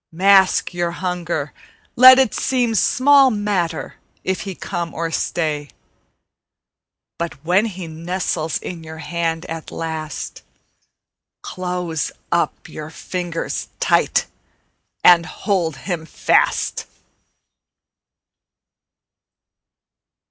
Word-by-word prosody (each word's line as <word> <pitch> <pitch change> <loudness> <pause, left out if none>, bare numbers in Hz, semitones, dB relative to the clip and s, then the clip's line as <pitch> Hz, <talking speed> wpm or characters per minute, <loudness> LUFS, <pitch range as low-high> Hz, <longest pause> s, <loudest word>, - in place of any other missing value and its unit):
Mask 190 +2 +4
your 175 -1 -1
hunger; 175 -5 -3 0.4
let 255 +1 +10
it 265 -4 +3
seem 245 -3 0
Small 270 +5 +5
matter 205 -7 -2 0.3
if 190 0 -1
he 195 -3 -6
come 170 -2 -5
or 165 0 -2
stay; 150 -3 -2 1.5
But 170 0 -3
when 185 +6 +3
he 185 -4 -7
nestles 165 0 -2
in 170 -2 -7
your 160 0 -9
hand 165 +2 -2
at 165 -1 -6
last, 160 -2 -5 1.0
Close 180 -3 -3 0.2
up - - 0
your 155 0 -8
fingers 175 +1 -4
tight - - +2 0.8
and 175 -1 +7
hold 180 -8 -1
him 165 +1 -5
fast. - - +1
175 Hz, 90 wpm, -20 LUFS, 160-190 Hz, 1.5 s, let